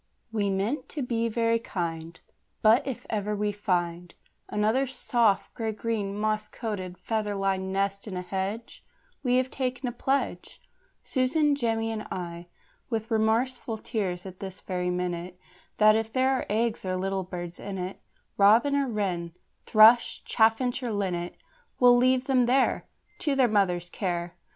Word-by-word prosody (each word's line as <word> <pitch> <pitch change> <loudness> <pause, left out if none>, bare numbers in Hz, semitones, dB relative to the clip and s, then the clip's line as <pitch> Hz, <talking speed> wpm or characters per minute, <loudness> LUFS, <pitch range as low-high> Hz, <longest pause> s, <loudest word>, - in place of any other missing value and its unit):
We 205 -3 0
meant 205 +9 -1
to 290 - -4
be 230 -1 0
very 230 0 +1
kind, 165 -5 -4 0.4
But 230 +6 +5
if 265 - -5
ever 210 -1 -1
we 210 0 0
find 175 -4 -2 0.3
Another 220 +6 +1
soft, 235 -5 +1
grey 225 -1 -2
green, 210 -2 -2
moss 215 0 0
coated, 185 -6 -5
feather 215 -2 -2
lined 190 -1 -1
nest 195 +1 -1
in 190 -3 -4
a 180 - -3
hedge, 195 +5 -4 0.4
We 250 -3 +2
have 255 0 +1
taken 255 -1 -2
a - - -1
pledge 270 +3 -2 0.4
Susan, 290 +3 +2
Jemmy, 225 -4 0
and 215 -1 -5
I 170 -1 -6 0.4
with 225 -2 -3
remorseful 225 +2 +1
tears, 195 -6 -3
at 185 -1 -9
this 190 -1 -7
very 180 -1 -2
minute, 180 0 -3 0.4
That 215 0 +6
if 225 0 -1
there 260 +2 +2
are 265 - -1
eggs 225 +2 0
or 185 -1 -1
little 190 +1 -1
birds 175 -1 -7
in 200 -1 -5
it 185 +1 -5 0.4
Robin 225 +8 +5
or 280 -1 +1
wren, 180 -7 -2 0.3
thrush, 225 +2 +6
chaffinch 235 +3 +2
or 245 -2 -2
linnet 180 -4 -2 0.4
We'll 245 -1 +7
leave 255 +1 +3
them 255 -3 +3
there 260 +2 +2 0.3
To 290 -4 0
their 260 -2 +4
mother's 180 -5 +1
care. 175 -3 -2
215 Hz, 155 wpm, -27 LUFS, 190-240 Hz, 0.4 s, We'll